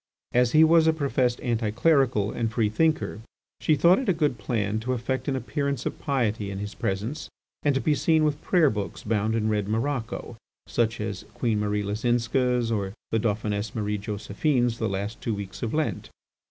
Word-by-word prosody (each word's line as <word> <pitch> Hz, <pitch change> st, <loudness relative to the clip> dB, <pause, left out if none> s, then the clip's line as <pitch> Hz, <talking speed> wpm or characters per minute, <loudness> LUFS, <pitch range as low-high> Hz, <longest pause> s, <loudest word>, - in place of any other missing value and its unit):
As 125 Hz, 0 st, +3 dB
he 155 Hz, -, +7 dB
was 160 Hz, 0 st, +5 dB
a 160 Hz, -, +5 dB
professed 135 Hz, -5 st, 0 dB
anti 115 Hz, -3 st, 0 dB
clerical 125 Hz, -4 st, +2 dB
and 115 Hz, -2 st, -2 dB
free 110 Hz, -2 st, +1 dB
thinker, 155 Hz, -3 st, 0 dB, 0.4 s
she 155 Hz, -, +3 dB
thought 170 Hz, +6 st, +5 dB
it 265 Hz, -, -2 dB
a -, -, +5 dB
good 150 Hz, -7 st, 0 dB
plan 105 Hz, 0 st, -1 dB
to 125 Hz, +3 st, -2 dB
affect 130 Hz, +3 st, -2 dB
an 140 Hz, -, 0 dB
appearance 135 Hz, +2 st, -2 dB
of -, -, -3 dB
piety 110 Hz, -7 st, -1 dB
in 100 Hz, -, -5 dB
his 105 Hz, +2 st, -5 dB
presence 110 Hz, +10 st, -3 dB, 0.3 s
and 145 Hz, -2 st, +2 dB
to 135 Hz, -, +1 dB
be 155 Hz, -, +2 dB
seen 160 Hz, +2 st, +3 dB
with 150 Hz, -1 st, 0 dB
prayer 165 Hz, -7 st, +3 dB
books 105 Hz, -2 st, -5 dB
bound 110 Hz, 0 st, 0 dB
in 110 Hz, -1 st, 0 dB
red 105 Hz, -2 st, 0 dB
morocco, 115 Hz, 0 st, -2 dB, 0.3 s
such 115 Hz, -1 st, 0 dB
as 105 Hz, -3 st, -4 dB
Queen 115 Hz, -3 st, 0 dB
Marie 105 Hz, 0 st, 0 dB
Leczinska's 120 Hz, +3 st, +1 dB
or 100 Hz, -3 st, -1 dB, 0.2 s
the 115 Hz, -, +2 dB
Dauphiness 105 Hz, -1 st, -1 dB
Marie 105 Hz, -1 st, -1 dB
Josephine's 115 Hz, +4 st, -1 dB
"The 110 Hz, -, 0 dB
Last 100 Hz, +3 st, -4 dB
Two 115 Hz, -, -1 dB
Weeks 100 Hz, -2 st, -7 dB
of 115 Hz, -, -2 dB
Lent." 155 Hz, +1 st, -2 dB
115 Hz, 190 wpm, -26 LUFS, 105-140 Hz, 0.4 s, he